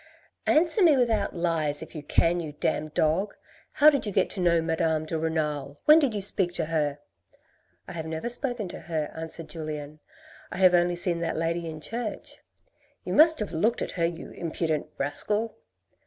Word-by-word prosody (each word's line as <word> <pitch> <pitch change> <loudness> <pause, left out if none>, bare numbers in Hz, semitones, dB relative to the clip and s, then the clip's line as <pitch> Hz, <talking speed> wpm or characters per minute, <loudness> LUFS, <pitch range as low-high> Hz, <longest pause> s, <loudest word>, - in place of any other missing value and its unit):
" - - -54
Answer 330 +6 +4
me 320 -6 +6
without 225 -5 +1
lies, 160 -4 0
if - - -13
you 155 - -6
can, 170 +4 +1
you 155 -3 -6
damned 150 +1 -2
dog, 180 +6 +1 0.4
how 305 +1 +6
did 280 - -1
you - - -2
get 190 -1 +1
to - - -4
know 170 -2 +3
Madame 160 -1 0
de 160 - -4
Renal? 150 -3 -2
When 305 +1 +8
did 270 -8 0
you 205 - -2
speak 190 -3 +2
to 165 - -1
her?" 150 -3 -1 0.5
" - - -40
I - - -8
have 160 -2 -6
never 160 +7 -4
spoken 245 -3 -2
to - - -8
her," 155 -3 -4
answered 160 0 -4
Julien, 155 -2 -7 0.3
" - - -22
I - - -6
have 185 -1 +5
only 175 0 +3
seen 175 -1 +1
that 165 -1 -2
lady 165 +1 -2
in 155 -1 -8
church." 230 +4 -6 0.3
" - - -39
You - - -3
must 320 +1 +6
have 210 - -3
looked 205 +8 0
at - - -5
her, 170 -3 -1
you 170 0 -5
impudent 160 -2 -3
rascal." 210 +11 +1
170 Hz, 200 wpm, -26 LUFS, 155-205 Hz, 0.5 s, When